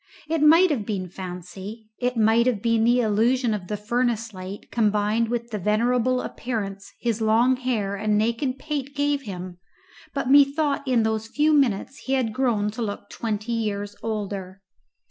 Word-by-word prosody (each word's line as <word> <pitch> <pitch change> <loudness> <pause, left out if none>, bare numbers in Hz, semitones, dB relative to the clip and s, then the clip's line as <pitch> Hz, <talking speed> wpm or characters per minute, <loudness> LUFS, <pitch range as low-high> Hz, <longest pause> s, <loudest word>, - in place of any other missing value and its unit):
It 320 -1 0
might 325 +4 +6
have 250 -8 0
been 195 -4 -3
fancy, 190 +4 -8
it 250 -1 -1
might 225 +2 +4
have 240 -5 +1
been 230 +1 +2
the 245 +1 +4
illusion 230 +2 +2
of 195 -4 -4
the 210 - -3
furnace 230 +1 -1
light 185 +2 -8
combined 215 0 +1
with 235 0 -3
the 210 - -3
venerable 245 +5 +1
appearance 200 -5 -5
his 230 -2 -1
long 230 +4 +4
hair 230 -6 -1
and 210 +1 +1
naked 235 +5 0
pate 285 -1 -4
gave 285 0 +1
him, 185 -5 -7 0.5
but 275 -3 -2
methought 280 +1 +4
in 245 -3 +3
those 220 0 -1
few 300 +6 +2
minutes 265 -2 +1
he 265 - -1
had 250 -5 +1
grown 220 -5 +1
to 225 - -6
look 205 -3 -5
twenty 220 0 -3
years 205 -2 -2
older. 200 -3 -4
225 Hz, 165 wpm, -24 LUFS, 205-255 Hz, 0.5 s, might